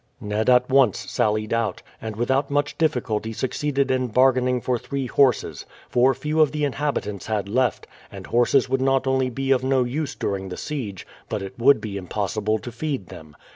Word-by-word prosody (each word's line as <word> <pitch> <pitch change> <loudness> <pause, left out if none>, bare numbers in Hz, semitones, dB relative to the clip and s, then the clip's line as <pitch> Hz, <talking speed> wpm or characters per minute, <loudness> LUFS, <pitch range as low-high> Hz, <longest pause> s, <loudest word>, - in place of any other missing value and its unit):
Ned 105 +3 -1
at 125 0 +5
once 130 -7 +3
sallied 110 0 0
out, 115 -5 -1 0.2
and 110 -1 -5
without 130 +5 0
much 145 0 0
difficulty 115 -9 -1
succeeded 140 +3 -1
in 130 -1 +1
bargaining 125 +1 +3
for 125 +1 -1
three 140 +1 -4
horses; 130 -1 +1 0.2
for 130 +2 +3
few 155 +1 0
of 150 - +4
the 150 -1 -2
inhabitants 135 -8 -3
had 105 -3 -1
left, 125 +3 0 0.3
and - - -9
horses 120 +2 +3
would 130 +1 0
not 135 0 +2
only 130 -1 +1
be 135 +2 -2
of 130 -1 +3
no 130 -1 +2
use 140 +5 -3
during 95 -1 -3
the 90 - -6
siege, 115 -11 -5 0.2
but 105 -2 -3
it 95 0 -7
would 140 +4 +5
be 100 -2 -5
impossible 105 +3 -1
to 120 +3 -8
feed 130 - -4
them. 75 -2 -12
125 Hz, 185 wpm, -23 LUFS, 110-135 Hz, 0.3 s, at